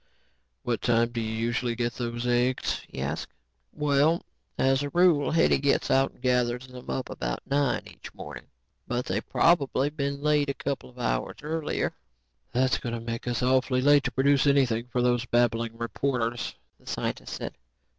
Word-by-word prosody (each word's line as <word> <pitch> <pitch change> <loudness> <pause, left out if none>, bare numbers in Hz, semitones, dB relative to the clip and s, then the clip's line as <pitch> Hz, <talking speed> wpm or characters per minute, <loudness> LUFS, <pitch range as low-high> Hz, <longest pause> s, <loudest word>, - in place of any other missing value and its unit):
"What 120 -2 -1
time 115 -1 +3
do 120 -1 -2
you 110 -1 -3
usually 120 +1 -1
get 120 0 -1
those 120 0 -4
eggs?" 125 +1 +1
he - - -8
asked. - - -3 0.4
"Well, 150 +2 +2 0.3
as 135 +1 +3
a 145 - -2
rule, 170 -3 +4
Hetty 165 -3 +3
gets 140 0 +1
out 135 0 +3
and - - -24
gathers 125 0 +1
them 125 -1 -11
up 130 - -2
about - - -4
nine 140 -3 +1
each - - -11
morning. - - -9 0.4
But 125 +1 -1
they've 100 +4 -3
probably 145 -4 +3
been 140 -2 -2
laid 150 -1 +3
a 140 - -1
couple 140 - -4
of 125 - -20
hours - - -1
earlier. 160 +1 -1 0.6
"That's 130 +1 +2
going 120 -1 -3
to - - -4
make 115 +1 -5
us 120 -1 -1
awfully 130 0 +2
late 145 0 +6
to 130 - 0
produce 140 +3 +3
anything 125 -4 +3
for 125 0 0
those 120 -1 +1
babbling 115 -1 +1
reporters," 120 0 -2 0.2
the - - -24
scientist - - -3
said. - - -5
125 Hz, 175 wpm, -27 LUFS, 120-140 Hz, 0.6 s, late